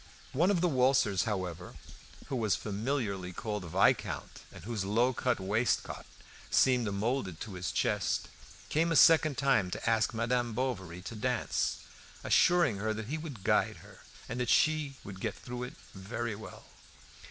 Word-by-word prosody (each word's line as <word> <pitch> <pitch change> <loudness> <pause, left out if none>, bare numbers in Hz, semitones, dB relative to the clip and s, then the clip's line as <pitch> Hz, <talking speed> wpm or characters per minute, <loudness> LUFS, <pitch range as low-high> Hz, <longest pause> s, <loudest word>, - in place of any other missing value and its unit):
One 170 +8 +3
of 190 -4 +2
the 180 - +3
waltzers, 130 - +3
however, 90 -4 -4 0.5
who 135 - -4
was 110 -7 +1
familiarly 105 -3 -2
called 105 0 -4
Viscount, - - +1
and - - -12
whose 110 -2 -3
low 115 +6 +2
cut 125 -1 0
waistcoat 105 +5 -1 0.4
seemed 125 -5 +3
moulded 100 -4 -2
to 110 - -6
his 90 -1 -3
chest, - - 0 0.4
came 165 +2 +1
a - - +2
second 155 -2 +6
time 135 -9 +2
to - - -5
ask 110 -2 +2
Madame 120 +1 0
Bovary 95 -8 -3
to 115 - -7
dance, 125 +2 -1 0.4
assuring 175 - +4
her 110 +2 -1
that 110 +1 -6
he 155 +2 -2
would 140 - -8
guide - - +2
her, - - -15 0.3
and 120 - -4
that 125 -2 -1
she 155 -3 +3
would 100 -2 -9
get - - -3
through 125 0 -7
it 125 - -6 0.2
very 110 +4 -4
well. 105 +1 -11
115 Hz, 160 wpm, -31 LUFS, 100-130 Hz, 0.5 s, second